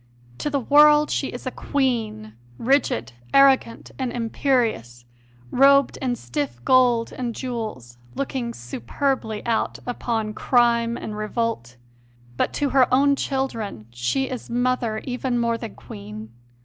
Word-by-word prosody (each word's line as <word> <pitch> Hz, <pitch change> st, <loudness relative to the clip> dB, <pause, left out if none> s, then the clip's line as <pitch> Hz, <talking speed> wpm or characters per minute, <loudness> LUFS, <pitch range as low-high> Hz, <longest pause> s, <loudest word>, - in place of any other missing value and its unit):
To -, -, -1 dB
the 285 Hz, -1 st, 0 dB
world 295 Hz, +3 st, +5 dB
she -, -, 0 dB
is -, -, -8 dB
a -, -, -2 dB
Queen, 225 Hz, -, -2 dB, 0.2 s
rigid, 225 Hz, -, +1 dB, 0.2 s
arrogant, 270 Hz, -4 st, +4 dB
and 255 Hz, -2 st, -1 dB
imperious, 225 Hz, -, -1 dB, 0.5 s
robed 275 Hz, +1 st, +5 dB
in 250 Hz, -2 st, -1 dB
stiff 120 Hz, -, -4 dB
gold 245 Hz, -3 st, +4 dB
and 240 Hz, -3 st, -4 dB
jewels, 215 Hz, -, -6 dB, 0.2 s
looking 260 Hz, -3 st, -3 dB
superbly 215 Hz, -, -3 dB
out 230 Hz, -2 st, 0 dB
upon 225 Hz, -3 st, -2 dB
crime 235 Hz, -1 st, +2 dB
and 215 Hz, -, -6 dB
revolt; 215 Hz, -, -3 dB, 0.6 s
but -, -, 0 dB
to 290 Hz, -1 st, 0 dB
her 265 Hz, -1 st, +3 dB
own 280 Hz, +2 st, +4 dB
children 230 Hz, -, -3 dB
she 125 Hz, -, -1 dB
is 255 Hz, -2 st, -6 dB
Mother 240 Hz, -2 st, 0 dB
even 250 Hz, -1 st, -2 dB
more 235 Hz, -1 st, +1 dB
than 230 Hz, -2 st, -7 dB
Queen. 105 Hz, +2 st, -10 dB
235 Hz, 130 wpm, -23 LUFS, 210-265 Hz, 0.6 s, world